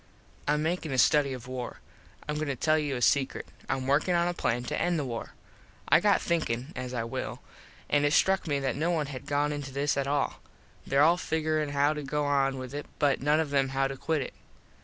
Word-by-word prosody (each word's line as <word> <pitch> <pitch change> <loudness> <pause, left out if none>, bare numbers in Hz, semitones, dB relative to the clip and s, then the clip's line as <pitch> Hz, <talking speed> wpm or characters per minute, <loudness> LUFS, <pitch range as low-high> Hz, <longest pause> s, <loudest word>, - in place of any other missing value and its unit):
Im 150 +1 +2
makin 165 -2 -1
a 130 - -1
study 145 +1 +4
of 125 -3 -6
war. 130 -1 -5 0.5
Im 150 0 -2
goin 155 0 -2
to 140 - -1
tell 155 +4 +2
you 145 -3 -1
a 125 - -2
sekrut. 135 +1 +2 0.2
Im 130 -1 -1
workin 145 +6 +2
on 170 0 +2
a 175 - 0
plan 120 -7 -1
to - - -2
end 175 0 +1
the 145 - -1
war. 115 -2 -6 0.5
I - - +7
got - - +4
thinkin, 150 -4 -1
as 125 0 -4
I 120 -2 -2
will, 115 - -4 0.5
an 145 0 +2
it 145 - +3
struck 190 +2 +3
me 145 -2 +1
that 135 - -1
no 160 +5 0
one 160 -4 +1
had 130 0 -8
gone 145 +1 +1
into 145 -2 -5
this 140 +2 0
at 140 -1 0
all. 145 0 -1 0.5
There 140 +1 +4
all 170 +3 +5
figurin 155 -3 -1
how 145 +1 +2
to 150 - -5
go 150 +1 -1
on 135 -1 +2
with 130 0 -7
it 145 0 -5
but 140 -4 +2
none 150 +3 +3
of 150 -3 -1
em 135 -1 +2
how 135 0 +1
to 135 - -5
quit 150 +1 -1
it. - - -8
145 Hz, 235 wpm, -29 LUFS, 135-155 Hz, 0.5 s, I